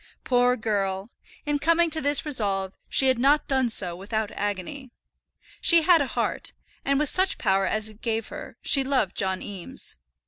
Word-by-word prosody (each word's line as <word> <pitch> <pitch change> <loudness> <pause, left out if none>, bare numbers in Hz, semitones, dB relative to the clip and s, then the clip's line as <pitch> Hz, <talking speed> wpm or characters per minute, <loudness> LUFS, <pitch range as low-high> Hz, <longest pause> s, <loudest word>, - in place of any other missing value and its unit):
Poor 250 0 +2
girl! 200 -1 -2 0.3
in 295 -1 -1
coming 335 +2 +2
to 315 0 +2
this 290 +1 +3
resolve 200 -9 0 0.2
she 270 - +3
had 260 -2 +2
not 285 +4 +2
done 265 -3 +1
so 180 -6 0
without 210 +3 -4
agony. 205 +7 -5 0.7
She 335 -1 +5
had 335 -1 +5
a 280 - -1
heart, - - -3 0.3
and 275 0 +1
with 300 +1 +1
such 380 +1 +2
power 195 -2 +1
as 215 0 -2
it 215 0 -16
gave 225 -1 -3
her, - - -9
she 275 - +4
loved 260 -8 0
John 190 -1 -1
Eames. 195 -4 -6
245 Hz, 175 wpm, -25 LUFS, 200-285 Hz, 0.7 s, She